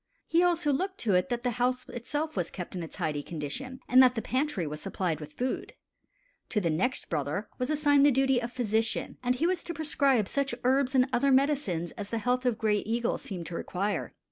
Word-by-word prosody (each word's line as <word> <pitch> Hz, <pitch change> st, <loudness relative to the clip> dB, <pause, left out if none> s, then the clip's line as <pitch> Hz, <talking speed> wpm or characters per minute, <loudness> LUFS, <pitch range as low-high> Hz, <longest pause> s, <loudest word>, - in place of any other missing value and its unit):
He 335 Hz, +1 st, +3 dB
also 340 Hz, -4 st, +2 dB
looked 375 Hz, +7 st, -2 dB
to 215 Hz, -4 st, +1 dB
it 180 Hz, +8 st, +2 dB
that 240 Hz, -1 st, -2 dB
the 250 Hz, -, +1 dB
house 250 Hz, +1 st, +1 dB
itself 295 Hz, +6 st, -3 dB
was 175 Hz, -4 st, -1 dB
kept 180 Hz, -, -7 dB
in 180 Hz, -, -4 dB
a 165 Hz, -, -5 dB
tidy 155 Hz, -4 st, -3 dB
condition, 175 Hz, -, -6 dB
and 255 Hz, +1 st, +7 dB
that 255 Hz, -1 st, +5 dB
the 225 Hz, -, -1 dB
pantry 260 Hz, -, -1 dB
was 150 Hz, 0 st, -5 dB
supplied 180 Hz, -5 st, -2 dB
with 150 Hz, -1 st, -9 dB
food. 255 Hz, +7 st, -3 dB, 0.8 s
To 215 Hz, -, +1 dB
the 170 Hz, -5 st, 0 dB
next 195 Hz, +12 st, 0 dB
brother 160 Hz, +7 st, -2 dB
was 250 Hz, -, -1 dB
assigned 290 Hz, -2 st, +4 dB
the 290 Hz, -, +7 dB
duty 270 Hz, -1 st, +3 dB
of 235 Hz, 0 st, -4 dB
physician, 225 Hz, -2 st, -1 dB
and 250 Hz, 0 st, +1 dB
he 290 Hz, +6 st, 0 dB
was 360 Hz, -1 st, +1 dB
to 340 Hz, -, -6 dB
prescribe 275 Hz, -8 st, +2 dB
such 275 Hz, -1 st, -1 dB
herbs 265 Hz, +1 st, +2 dB
and 255 Hz, 0 st, +5 dB
other 275 Hz, +3 st, +3 dB
medicines 260 Hz, -, +1 dB
as 205 Hz, 0 st, -5 dB
the 230 Hz, -, -1 dB
health 250 Hz, +3 st, 0 dB
of 235 Hz, -3 st, +1 dB
Gray 215 Hz, -2 st, +2 dB
Eagle 235 Hz, +3 st, -1 dB
seemed 180 Hz, -4 st, -6 dB
to 170 Hz, -, -6 dB
require. 200 Hz, +4 st, -2 dB
245 Hz, 220 wpm, -29 LUFS, 190-275 Hz, 0.8 s, and